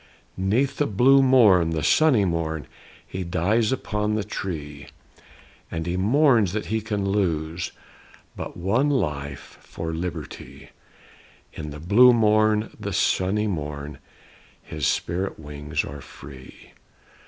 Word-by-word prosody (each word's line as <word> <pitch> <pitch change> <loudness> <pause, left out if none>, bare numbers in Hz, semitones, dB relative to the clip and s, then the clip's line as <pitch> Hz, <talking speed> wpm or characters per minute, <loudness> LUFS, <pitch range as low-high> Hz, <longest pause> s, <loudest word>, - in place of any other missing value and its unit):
'Neath 120 +9 0
the 145 - +1
blue 130 +7 +5
morn, 110 -11 +5
the 80 -2 -2
sunny 130 - +4
morn, 80 -3 -2 0.4
He 95 - -5
dies 90 +6 +1
upon 105 -4 -1
the 110 - -1
tree; 75 -8 -6 0.8
And 80 -1 -4
he 90 0 -2
mourns 115 - +3
that 110 - -3
he 110 +1 -1
can 105 -2 -2
lose 85 -4 -1 0.6
But - - -7
one 110 +11 +1
life 70 - -3
for 80 -1 -6
Liberty; 80 -5 -7 0.8
And 75 - -6
in 75 - -7
the 75 - -8
blue 115 +10 +6
morn, 110 -1 +2
the - - -4
sunny 100 +3 +1
morn, 75 -6 -5 0.6
His 75 -3 -3
spirit 90 +3 -2
wings 75 0 -4
are 70 0 -8
free. 65 -1 -13
95 Hz, 130 wpm, -24 LUFS, 75-110 Hz, 0.8 s, blue